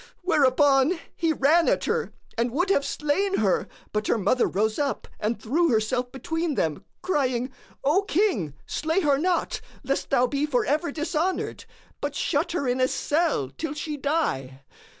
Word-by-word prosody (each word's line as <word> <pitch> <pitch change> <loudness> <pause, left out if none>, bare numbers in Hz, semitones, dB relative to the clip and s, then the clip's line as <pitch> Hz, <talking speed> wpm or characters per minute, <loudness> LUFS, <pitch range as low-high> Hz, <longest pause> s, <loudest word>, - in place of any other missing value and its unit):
Whereupon 285 -1 +4 0.2
he 330 -2 +1
ran 315 +3 +4
at - - +1
her 460 +1 -1 0.2
and 235 +2 +1
would 350 +10 0
have 280 - +3
slain 380 +9 0
her, 195 -4 +1 0.3
but 210 0 -1
her - - +2
mother 220 +5 +2
rose 215 +4 0
up 285 -2 -1
and 215 +1 -1
threw 320 +10 +1
herself 245 +2 0
between 325 +3 -2
them 155 -8 -1 0.2
crying,:—O 270 +2 0
King, 265 - +1
slay 320 +5 0
her 285 -4 +3
not, 355 +1 0 0.2
lest 270 +1 -1
thou 250 -2 +4
be 280 +3 -1
for 250 -5 +1
ever 300 +3 0
dishonoured; 325 +4 -2 0.4
but - - -3
shut 325 +2 0
her 285 -7 -1
in 250 +1 +1
a 255 - +4
cell 295 - 0
till 310 -2 -3
she 300 0 -4
die. 270 - -1
285 Hz, 160 wpm, -25 LUFS, 245-325 Hz, 0.4 s, Whereupon